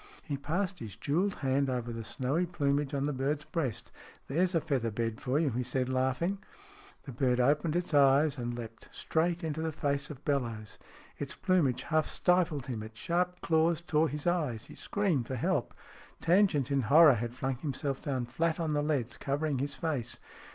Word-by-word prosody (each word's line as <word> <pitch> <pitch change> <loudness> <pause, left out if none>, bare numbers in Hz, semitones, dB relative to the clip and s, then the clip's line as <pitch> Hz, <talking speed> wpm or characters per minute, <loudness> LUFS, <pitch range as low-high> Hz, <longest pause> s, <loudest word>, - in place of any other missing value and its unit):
He 145 - -3
passed 180 +6 -2
his 105 -6 -7
jewelled 170 - 0
hand 135 +1 +2
over 120 -2 -2
the 115 0 -5
snowy 135 +10 -1
plumage 145 -4 0
on 140 0 0
the 150 - -1
bird's 140 +3 -1
breast. 140 -10 -3 0.2
" - - -25
There's 175 +6 +1
a - - +5
feather 140 -7 -1
bed 115 +1 -3
for 130 +2 0
you," 155 -3 +2
he 120 +2 -1
said, 130 +1 -1
laughing. 130 +9 0 0.6
The 135 - -8
bird 125 0 +1
opened 150 +5 +2
its 175 -2 -1
eyes, 140 +1 +5
and 120 0 -3
leaped 115 -1 -9
straight 170 +2 0
into 160 -1 -2
the 160 0 -1
face 140 -1 -1
of 145 -3 -10
Bellowes. 115 -7 -2 0.4
Its - - -4
plumage 165 -10 +1
half 155 -1 +1
stifled 175 -7 +1
him, 120 -5 -4
its 110 +1 -10
sharp 180 +3 -1
claws 160 0 +2
tore 160 -2 +1
his 150 0 -5
eyes. 150 -11 0
He - - -12
screamed 180 - -1
for 130 - -3
help. 120 - 0 0.5
Tangent, 170 -6 +3
in 140 -1 +2
horror, 150 +5 +7
had 120 +1 -3
flung 130 -1 -2
himself 140 0 -3
down 130 -4 -2
flat 160 +7 -1
on 160 -2 0
the 145 - +1
leads, 140 -6 -1
covering 140 0 -1
his 140 +2 -2
face. 145 -8 -3
140 Hz, 190 wpm, -31 LUFS, 125-160 Hz, 0.6 s, horror